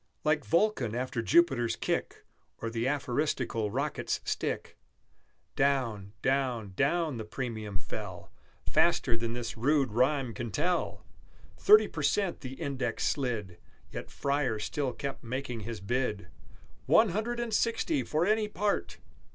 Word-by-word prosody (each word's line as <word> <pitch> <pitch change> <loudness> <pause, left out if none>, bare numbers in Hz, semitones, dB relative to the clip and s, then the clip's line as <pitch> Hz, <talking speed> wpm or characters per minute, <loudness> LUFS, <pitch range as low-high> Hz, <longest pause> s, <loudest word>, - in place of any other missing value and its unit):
Like 150 0 +2
Vulcan 165 - +2
after 125 -1 -1
Jupiter's 130 -3 +3
kick, - - -2 0.3
Or 115 - -4
the 115 +1 -1
aphoristical 130 -5 0
Rocket's - - -1
stick, - - -2 0.8
Down, 120 -8 +1
down, 125 -7 0
down, 155 - +1
the 110 - -4
premium 110 -3 -4
fell, 95 - -7 0.3
Faster 115 - +3
than 115 0 -2
this 120 -1 -4
rude 135 +1 +2
rhyme 130 +1 +2
can 120 +3 -4
tell! 175 - -1 0.5
Thirty 425 +2 +7
per - - -5
cent 195 -4 +1
the 130 -1 -6
index 130 -4 -1
slid, 110 - -2 0.3
Yet - - -6
Freyer 140 -5 0
still 130 +5 -2
kept 140 +2 -5
making 125 0 -3
his 110 0 -5
bid, 105 -2 -1 0.6
"One 220 -1 +6
Hundred 220 +6 -1
and 235 -2 -2
Sixty 230 +8 +1
for 155 +3 0
any 215 +1 +2
part!" 205 0 -1
130 Hz, 135 wpm, -30 LUFS, 115-155 Hz, 0.8 s, Thirty